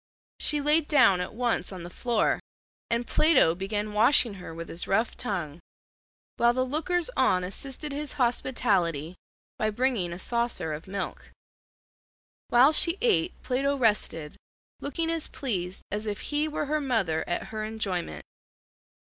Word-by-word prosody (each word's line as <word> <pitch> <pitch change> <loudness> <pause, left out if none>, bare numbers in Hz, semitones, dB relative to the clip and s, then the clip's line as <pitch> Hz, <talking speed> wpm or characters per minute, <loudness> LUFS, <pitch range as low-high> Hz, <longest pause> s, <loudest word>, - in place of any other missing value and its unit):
She 295 -1 +2
laid 300 +1 +3
down 195 -11 +5
at 180 - -5
once 235 -7 0
on 185 -3 -7
the 175 - -7
floor, 235 +3 +1 0.5
and 235 +1 0
Plato 290 - +4
began 205 +3 -3
washing 230 +1 +5
her 180 - -8
with 165 +1 -7
his 170 - -3
rough 220 +4 +1
tongue, 175 - -3 0.8
while 235 0 +4
the 255 +1 0
lookers 345 - -1
on 185 -8 +3
assisted 270 +10 -5
his 290 +1 -4
hospitality 195 - 0 0.4
by 215 - +1
bringing 215 -5 0
a 170 - -5
saucer 235 -5 -1
of 155 +4 -7
milk. 195 0 -5 1.2
While 260 +5 +6
she 335 +3 +4
ate 425 -7 +1
Plato 275 +2 0
rested, 205 - 0 0.4
looking 325 +3 -2
as 330 -2 -2
pleased 190 -8 -3
as 210 +1 -3
if 205 -1 -3
he 300 +1 +2
were 300 -1 -2
her 305 +1 0
mother 215 - 0
at 175 - -2
her 215 -1 -4
enjoyment. 195 - -3
230 Hz, 150 wpm, -27 LUFS, 185-280 Hz, 1.2 s, While